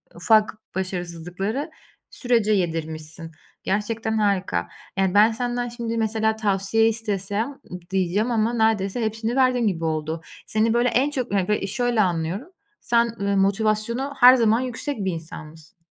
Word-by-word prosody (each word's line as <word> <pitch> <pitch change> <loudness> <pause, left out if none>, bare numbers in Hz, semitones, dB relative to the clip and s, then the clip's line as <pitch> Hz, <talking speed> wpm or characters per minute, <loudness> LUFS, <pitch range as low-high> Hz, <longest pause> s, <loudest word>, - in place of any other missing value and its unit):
ufak 215 +5 +3 0.2
başarısızlıkları 185 - -4 0.4
sürece 235 -4 +1
yedirmişsin. 160 -3 -3 0.3
Gerçekten 220 +2 -1
harika. 190 - 0 0.3
Yani, 190 -1 +1
ben 210 +2 +6
senden 245 +1 -2
şimdi 235 -1 -4
mesela 220 0 +1
tavsiye 215 +1 +1
istesem 215 +1 -2
ı 180 -9 -11
diyeceğim 195 +5 0
ama 225 0 +1
neredeyse 220 -1 +1
hepsini 225 +2 -2
verdin 255 -3 +3
gibi 165 -5 -1
oldu. 160 0 -2 0.3
Seni 220 +1 +1
böyle 240 +1 +3
en 265 +5 +2
çok 255 -7 -3
yani, 190 -2 +1
böyle, 210 - +1
i 195 - -2
şöyle 240 +2 +1
anlıyorum, 180 - -1 0.3
sen, 235 0 +2 0.2
ııı, 200 0 +1
motivasyonu 215 +7 0
her 250 +1 +9
zaman 225 -2 +3
yüksek 255 -2 -4
bir 190 - +1
insanmışsın. 160 +1 -10
215 Hz, 145 wpm, -23 LUFS, 185-235 Hz, 0.4 s, her